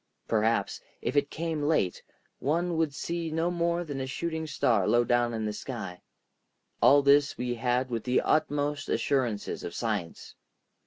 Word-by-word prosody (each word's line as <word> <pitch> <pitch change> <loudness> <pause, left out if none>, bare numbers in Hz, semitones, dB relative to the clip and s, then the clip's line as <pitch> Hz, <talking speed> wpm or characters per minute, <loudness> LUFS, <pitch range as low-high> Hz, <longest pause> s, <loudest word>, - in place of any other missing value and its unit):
Perhaps, 110 +1 +1 0.2
if - - -3
it 145 0 +2
came 165 -1 -3
late, 145 - +1 0.4
one 170 +4 0
would 160 -2 +1
see 170 +4 -3
no 165 +2 0
more 170 0 0
than 145 -5 -5
a 130 - -3
shooting 160 +3 -3
star 115 -9 +2
low 120 0 +4
down 120 0 +2
in 110 -1 -3
the 105 - -2
sky. 100 -7 -6 0.8
All 140 +1 +6
this 140 +1 +4
we 125 0 -2
had 125 +2 0
with 115 -2 -2
the 125 0 +2
utmost 145 -1 0
assurances 120 -7 -1
of - - -6
science. 105 -8 -3
140 Hz, 160 wpm, -28 LUFS, 115-160 Hz, 0.8 s, All